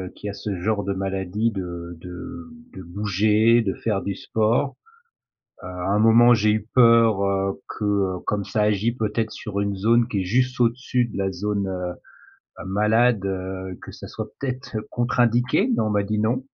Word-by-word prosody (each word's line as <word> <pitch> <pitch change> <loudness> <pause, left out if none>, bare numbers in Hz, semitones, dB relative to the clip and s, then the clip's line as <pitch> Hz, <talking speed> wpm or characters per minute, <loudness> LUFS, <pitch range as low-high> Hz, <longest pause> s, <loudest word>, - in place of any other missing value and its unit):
qui 105 - -6
a 100 - -5
ce 105 -1 -4
genre 105 +1 0
de 100 0 -2
maladie 95 +3 -1
de 85 -3 -6
de 90 - -8 0.3
de 95 - -8
bouger, 105 +5 +2
de 95 - -1
faire 105 -4 -2
du 100 - -2
sport, 115 +8 0 0.9
heu, - - -8
à 90 +1 -4
un 105 - +2
moment 120 +2 +6
j'ai 110 -1 +2
eu 110 -1 -2
peur 115 -4 +5 0.4
que 100 -3 -1
comme 105 -1 -1
ça 110 - -2
agit, 105 +2 +1
peut-être, 110 -1 -2
sur 100 -2 -5
une 100 0 -1
zone 115 +4 +3
qui 105 -5 -2
est - - -2
juste 125 +6 0
au-dessus 125 +1 +1
de 115 - -9
la 95 -1 -1
zone, 100 +2 -2
heu, 90 -1 -6 0.5
malade, 105 +3 +2
heu, 95 -1 -4
que - - -10
ça - - -10
soit - - -6
peut-être 130 -2 -5 0.2
contre-indiqué 120 - +2
mais - - 0
on 110 - 0
m'a 105 -1 +1
dit 105 +1 -2
non. 120 +4 0
105 Hz, 175 wpm, -23 LUFS, 95-115 Hz, 0.9 s, moment